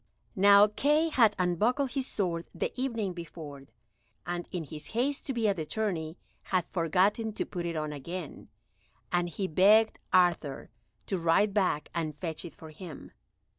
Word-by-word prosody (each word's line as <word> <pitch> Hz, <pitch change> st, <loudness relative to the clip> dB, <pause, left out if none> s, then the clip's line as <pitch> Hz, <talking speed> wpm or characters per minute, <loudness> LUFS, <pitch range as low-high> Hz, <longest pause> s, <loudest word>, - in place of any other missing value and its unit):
Now 200 Hz, +1 st, +7 dB
Kay 295 Hz, +9 st, +2 dB
had 225 Hz, -8 st, +4 dB
unbuckled 220 Hz, -, +1 dB
his 270 Hz, -2 st, -2 dB
sword 170 Hz, -4 st, -2 dB
the -, -, -2 dB
evening 230 Hz, -7 st, -2 dB
before, 155 Hz, -5 st, -9 dB, 0.6 s
and 175 Hz, 0 st, -4 dB
in 175 Hz, -3 st, -3 dB
his 150 Hz, +2 st, -9 dB
haste 275 Hz, +4 st, 0 dB
to 270 Hz, -, -1 dB
be 230 Hz, -3 st, +1 dB
at 200 Hz, -2 st, +1 dB
the 160 Hz, -, -2 dB
tourney 165 Hz, -3 st, -2 dB, 0.3 s
had 185 Hz, -3 st, 0 dB
forgotten 195 Hz, +6 st, +1 dB
to -, -, -2 dB
put 175 Hz, -2 st, -4 dB
it 170 Hz, -, -3 dB
on 155 Hz, -1 st, -2 dB
again, 165 Hz, +3 st, -7 dB, 0.6 s
and 175 Hz, 0 st, +1 dB
he 190 Hz, +3 st, -3 dB
begged 210 Hz, +6 st, +4 dB
Arthur 175 Hz, -7 st, +2 dB, 0.3 s
to 190 Hz, -, -2 dB
ride 170 Hz, +5 st, +3 dB
back 185 Hz, -7 st, +1 dB
and 155 Hz, -3 st, -3 dB
fetch 160 Hz, 0 st, -4 dB
it 170 Hz, -, -9 dB
for 160 Hz, -1 st, -11 dB
him. 155 Hz, -2 st, -10 dB
180 Hz, 165 wpm, -29 LUFS, 165-210 Hz, 0.6 s, Now